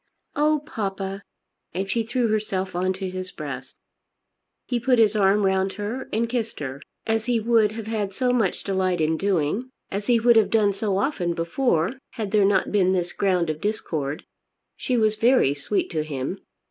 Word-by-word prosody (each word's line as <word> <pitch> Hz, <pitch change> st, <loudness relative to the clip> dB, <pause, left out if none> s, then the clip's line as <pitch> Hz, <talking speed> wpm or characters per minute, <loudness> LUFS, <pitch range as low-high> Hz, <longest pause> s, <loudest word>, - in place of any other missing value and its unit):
"Oh, 300 Hz, 0 st, +2 dB
papa!" 195 Hz, -6 st, -4 dB, 0.5 s
and 190 Hz, +2 st, -1 dB
she 230 Hz, +4 st, 0 dB
threw 240 Hz, +2 st, 0 dB
herself 200 Hz, -4 st, -1 dB
on 185 Hz, +1 st, +1 dB
to 190 Hz, 0 st, -4 dB
his 185 Hz, 0 st, -5 dB
breast. 135 Hz, -6 st, -7 dB, 0.9 s
He 245 Hz, -2 st, -1 dB
put 250 Hz, +1 st, +3 dB
his 220 Hz, -2 st, +4 dB
arm 200 Hz, 0 st, +3 dB
round 190 Hz, 0 st, +1 dB
her 215 Hz, +6 st, -5 dB
and 230 Hz, +2 st, +1 dB
kissed 230 Hz, -1 st, -3 dB
her, 135 Hz, -1 st, -5 dB, 0.2 s
as 225 Hz, 0 st, 0 dB
he 245 Hz, -2 st, +2 dB
would 220 Hz, -1 st, +3 dB
have 225 Hz, -1 st, -6 dB
had 215 Hz, -3 st, -2 dB
so 250 Hz, +5 st, 0 dB
much 225 Hz, -7 st, 0 dB
delight 185 Hz, -2 st, 0 dB
in 160 Hz, +1 st, +2 dB
doing, 195 Hz, -, 0 dB, 0.2 s
as 200 Hz, +1 st, -3 dB
he 240 Hz, -2 st, +4 dB
would 235 Hz, 0 st, +5 dB
have 220 Hz, -, +4 dB
done 210 Hz, -3 st, +3 dB
so 195 Hz, -1 st, -1 dB
often 190 Hz, -, 0 dB
before, 170 Hz, +4 st, 0 dB
had 220 Hz, -6 st, -4 dB
there 210 Hz, -2 st, +4 dB
not 200 Hz, 0 st, +2 dB
been 190 Hz, -2 st, +3 dB
this 175 Hz, -2 st, -1 dB
ground 180 Hz, -5 st, +1 dB
of 155 Hz, 0 st, -7 dB
discord. 155 Hz, -9 st, -2 dB, 0.5 s
She 250 Hz, -, -1 dB
was 215 Hz, -1 st, +2 dB
very 230 Hz, -, +4 dB
sweet 145 Hz, +8 st, -2 dB
to 155 Hz, -3 st, -1 dB
him. 150 Hz, +4 st, -4 dB
200 Hz, 185 wpm, -24 LUFS, 185-225 Hz, 0.9 s, would